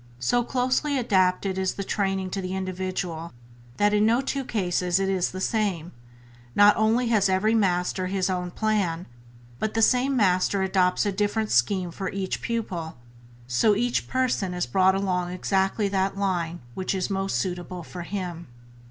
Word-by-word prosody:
So 240 - +1
closely 260 +4 0
adapted 190 -4 +1
is 190 -1 -1
the 200 - -3
training 195 -1 -1
to 195 - -2
the 185 0 -4
individual 185 -3 -4 0.4
that 205 0 +3
in 210 0 +3
no 230 +3 +4
two 275 0 -2
cases 180 -5 0
is 190 -2 +1
it - - -7
the 185 - -6
same; 190 -5 -1 0.6
not 205 0 +7
only 230 +3 +2
has 205 -4 +3
every 190 +4 +2
Master 185 -3 +1
His 190 0 0
own 180 -1 -2
plan, 185 -4 -1 0.5
but 220 0 -2
the 225 - +2
same 260 +3 +3
Master 190 -1 +2
adopts 185 0 +2
a 205 - +1
different 210 +2 -1
scheme 175 +8 +2
for 190 +2 -4
each 195 -1 -3
pupil, 225 -8 -3
and 160 - -9 0.5
so 130 - +3
each 240 +3 0
person 240 -8 0
is 180 - -1
brought 190 +9 +3
along 180 -2 -1
exactly 190 +3 0
that 195 0 0
line 175 -4 -1
which 190 +5 -2
is 190 +2 -2
most 195 -8 -1
suitable 180 +4 -4
for 175 +2 -8
him. 175 -2 -5
190 Hz, 170 wpm, -25 LUFS, 180-210 Hz, 0.6 s, not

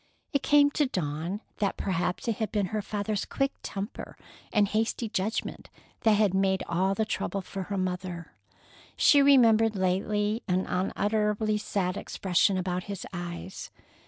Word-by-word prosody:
It 280 - +2
came 290 0 +5
to 295 -1 +1
Dawn 170 - -3 0.2
that 200 -2 -1
perhaps 185 +5 -2
it 230 - 0
had 220 -3 -2
been 205 -2 +1
her 215 - 0
father's 205 0 -2
quick 275 0 -1
temper 200 +4 -6 0.3
and 210 -2 +3
hasty 225 +2 -1
judgment 215 0 -3 0.3
that 220 - +4
had 205 -2 +3
made 190 0 +2
all 190 +3 +1
the 220 - 0
trouble 200 -2 -3
for 195 +1 -6
her 200 +1 -3
mother. 180 -2 -4 0.6
She 285 - +6
remembered 225 -6 +5
lately 205 +4 0
an 185 0 +1
unutterably 210 +3 0
sad 190 -3 -1
expression 190 +1 +1
about 180 -1 -2
his 200 -2 -6
eyes. 175 +1 -6
200 Hz, 150 wpm, -28 LUFS, 185-220 Hz, 0.6 s, She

